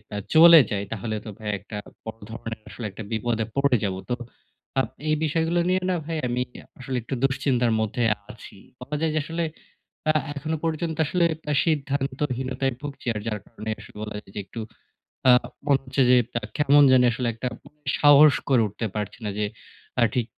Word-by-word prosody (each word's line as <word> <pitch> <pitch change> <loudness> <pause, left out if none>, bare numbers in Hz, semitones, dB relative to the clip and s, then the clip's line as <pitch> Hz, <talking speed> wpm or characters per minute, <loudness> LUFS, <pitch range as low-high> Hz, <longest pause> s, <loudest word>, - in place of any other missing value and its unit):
আ - - -2 0.2
চলে 165 +1 +10
যায় 100 -1 -1
তাহলে 110 +1 -3
তো - - -6
ভাই 110 -1 -4
একটা 105 +2 -8 0.3
বড় 110 0 -7
ধরনের 115 -1 -6
আসলে 120 - -7
একটা 105 +3 -8
বিপদে 115 0 0
পড়ে 140 -2 +3
যাবো। 95 -2 -1
তো 125 - +1 0.6
আপ 135 - 0 0.2
এই 155 - +4
বিষয়গুলো 165 +3 +1
নিয়ে 185 0 +2
না - - +1
ভাই 165 0 -3
আমি 125 +1 -1 0.4
আসলে 130 0 -3
একটু 130 - -3
দুশ্চিন্তার 130 -3 +2
মধ্যেi 115 +2 0 0.2
আছি। 115 - -13 0.2
বলা 130 +4 -5
যায় 160 -1 +1
যে - - +3
আসলে 165 +2 -2 0.7
আ - - 0 0.2
এখনো 155 +3 -2
পর্যন্ত 160 0 -1
আসলে 175 +3 +2 0.3
এ - - +2
সিদ্ধান্তহীনতায় 135 -3 -1
ভুগছি। 145 -3 -8
আর 105 - -3
যার 105 -2 -2
কারণে 110 -1 -8
আসলে 105 - -14
বলা 105 -1 -6
যায় - - -17
যে - - -2
একটু 115 - -9 0.7
আ - - +10 0.3
মনে 140 -2 +4
হচ্ছে 135 +1 0
যে 125 - +7 0.2
আ - - -25 0.2
কেমন 145 0 +6
জানি 125 -1 +6
আসলে 125 +1 -2
একটা 115 +3 -4 0.5
সাহস 145 0 +8 0.2
করে 130 -4 +5
উঠতে 105 +3 -5
পারছি 105 +2 -4
না। - - -1
যে 105 - +1 0.5
আ - - +4
ঠিক 125 -3 +1
130 Hz, 185 wpm, -25 LUFS, 115-150 Hz, 0.7 s, চলে